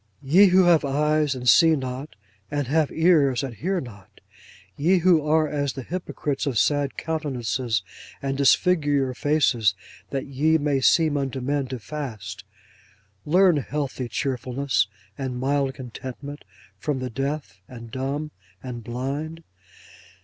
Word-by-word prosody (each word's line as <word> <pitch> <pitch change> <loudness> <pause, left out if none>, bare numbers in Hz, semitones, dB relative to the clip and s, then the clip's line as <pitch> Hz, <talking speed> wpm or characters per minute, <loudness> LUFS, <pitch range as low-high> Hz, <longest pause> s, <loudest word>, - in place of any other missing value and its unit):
Ye 180 +9 +6
who 185 0 +5
have 170 -3 +5
eyes 150 +1 +1
and 125 -1 -5
see 165 +4 +6
not, 130 0 -5 0.3
and 145 -1 -1
have 155 +3 +1
ears 150 -7 +3
and 135 -3 -4
hear 180 - -1
not; 105 - -12 0.6
ye 175 +6 +3
who 175 -3 +4
are 155 +1 +2
as 145 -2 -2
the 135 - -6
hypocrites 150 -3 -3
of 130 -5 -1
sad 145 +1 +1
countenances, 130 - -2 0.4
and 135 -1 -2
disfigure 145 +2 +3
your 135 -3 +1
faces 125 - +2 0.3
that 135 -1 -3
ye 150 +4 +2
may 145 -3 0
seem 155 +1 +4
unto 135 -1 -2
men 140 +1 -1
to 130 0 -5
fast; 120 -6 -7 0.8
learn 180 +1 +5
healthy 135 -1 -3
cheerfulness, 130 0 -1 0.3
and 130 -2 -3
mild 135 0 0
contentment, 130 +3 -8 0.3
from 150 -3 -1
the 130 -1 -4
deaf, 135 -6 -4
and 115 -2 -11
dumb, 140 +4 -3 0.3
and 120 -3 -6
blind! 140 +8 -4
140 Hz, 140 wpm, -24 LUFS, 130-155 Hz, 0.8 s, Ye